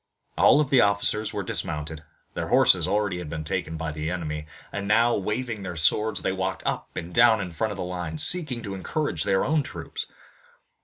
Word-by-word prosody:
All 150 - +5
the 135 -3 +4
officers 100 +1 +1
were - - -3
dismounted 75 +1 -3 0.3
their - - -3
horses - - +4
already 100 -3 0
had 85 -4 -6
been 80 0 -4
taken 80 0 -3
by 80 0 -3
the 80 +1 -4
enemy 75 -3 -4 0.2
and 100 -1 -4
now, 115 +3 +4
waving 110 +2 -3
their 90 -2 -5
swords, 105 +7 +1
they - - +1
walked 95 0 -3
up - - -3
and 85 +1 -5
down 115 0 +6
in 95 -3 -4
front 110 +7 -1
of 100 - -6
the - - -3
lines, 90 -3 -2
seeking 150 -10 +2
to 100 -3 -5
encourage 95 - -1
their 95 -1 +2
own 155 +2 +2
troops. 130 -2 -6
95 Hz, 195 wpm, -25 LUFS, 85-110 Hz, 0.3 s, down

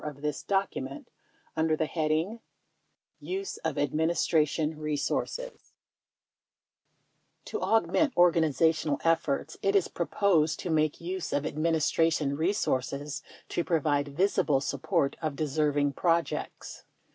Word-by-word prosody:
23 150 - -5
4 - - -20
of 140 - -17
this 150 -1 -2
document 190 -9 -2 0.5
under 160 0 +2
the 160 - +1
heading 160 +7 -1 0.8
"Use 390 +1 -4
of 160 -3 -3
Administra 155 +1 +2
tion 155 +1 -2
Resources": 155 - -3 1.7
To 430 - -4
augment 265 +6 +2
organizational 160 -3 +3
efforts 160 -2 0
it 195 +1 +1
is 195 - +3
proposed 170 -3 +1
to 175 - -3
make 155 -1 +1
use 180 +1 -4
of 145 +1 0
Administration 155 -2 +1
resources 145 -4 -1 0.3
to 170 - -1
provide 145 -4 +1
visible 165 -7 +2
support 140 0 -1
of 155 -3 -2
deserving 145 -1 +1
projects. 170 +2 -1
160 Hz, 115 wpm, -29 LUFS, 145-170 Hz, 1.7 s, organizational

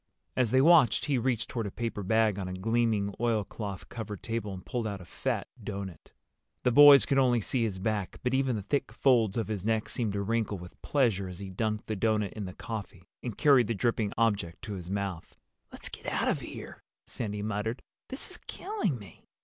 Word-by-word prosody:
As 125 -3 +2
they 130 +3 +4
watched 150 -7 +6
he 140 -4 +1
reached 120 -2 0
toward 115 -4 -3
a - - -5
paper 115 -2 -3
bag 110 +1 +2
on 95 - -3
a 90 - -4
gleaming 110 0 +1
oilcloth 105 -4 -2
covered 110 -4 -6
table 115 -3 -3
and 95 -1 -8
pulled 120 -3 -2
out 100 -2 -4
a 90 - -11
fat - - -2 0.2
doughnut. 100 -4 -6 0.5
The 125 - +3
boys 145 +2 +9
could 135 - +2
only 125 -3 +4
see 120 +3 -1
his 110 -5 0
back, 105 0 -2
but 125 +1 0
even 130 -2 +2
the 105 - -3
thick 135 +6 -1
folds 120 -6 +3
of 115 - 0
his 105 -4 -3
neck 110 0 +1
seemed 115 -5 -1
to 100 0 -1
wrinkle 110 -1 0
with 90 0 -12
pleasure 115 -9 +1
as 90 -1 -8
he 95 0 -7
dunked 105 +2 -2
the 110 - -2
doughnut 105 -1 +1
in 105 -2 -5
the 90 - -6
coffee 95 -5 -7
and 120 -5 -5
carried 135 -7 +5
the 115 - -1
dripping 110 -1 0
object 100 -7 0
to 105 - -5
his 90 -2 -7
mouth. 100 -4 -4 0.4
"Let's - - -5
get - - -9
out - - 0
of - - +1
here," - - -9 0.2
Sandy 105 -2 -4
muttered. 110 +3 -2 0.3
"This 265 - -4
is - - -2
killing 385 - -2
me." 100 -7 -14
110 Hz, 210 wpm, -29 LUFS, 100-120 Hz, 0.5 s, boys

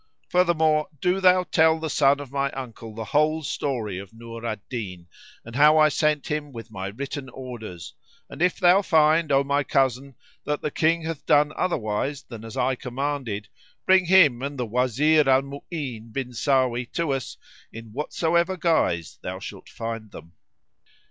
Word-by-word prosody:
Furthermore, 160 -4 +2
do 180 +5 +1
thou 185 0 +5
tell 160 -1 +3
the 160 - -3
son 140 -1 +3
of 140 -3 -9
my 140 0 0
uncle 115 -4 -8
the 110 - -4
whole 155 +7 +1
story 120 -9 -3
of 100 -1 -10
Nur 115 0 -9
al 115 -2 -2
Din, 95 -8 -6 0.4
and 115 +1 -10
how 150 +3 +6
I 155 0 +6
sent 150 0 +1
him 150 -1 -3
with 115 -3 -10
my 95 -3 -5
written 135 +5 -6
orders; 120 -10 -8 0.3
and - - -10
if 180 0 +2
thou 180 +2 +5
find, 160 -3 +3
O 135 0 +4
my 140 +1 +1
cousin,[FN#76] 135 -1 0 0.3
that 150 0 -2
the 150 - -1
King 165 +2 +1
hath 160 -2 -5
done 150 +1 +4
otherwise 140 -3 -2
than 115 -3 -10
as 115 -1 -8
I 130 - +2
commanded, 125 -5 -4 0.4
bring 185 -1 +5
him 160 -10 +5
and 140 +1 -4
the 125 - -2
Wazir 130 +6 +2
Al 135 0 +5
Mu'ín 140 -5 -7
bin 130 +2 -4
Sáwí 125 -1 0
to 165 -5 0
us 135 -2 -5 0.3
in 115 -1 -10
whatsoever 170 +6 0
guise 120 - 0
thou - - -5
shalt - - -9
find 115 -1 -6
them." 85 -3 -13
140 Hz, 170 wpm, -24 LUFS, 115-155 Hz, 0.4 s, how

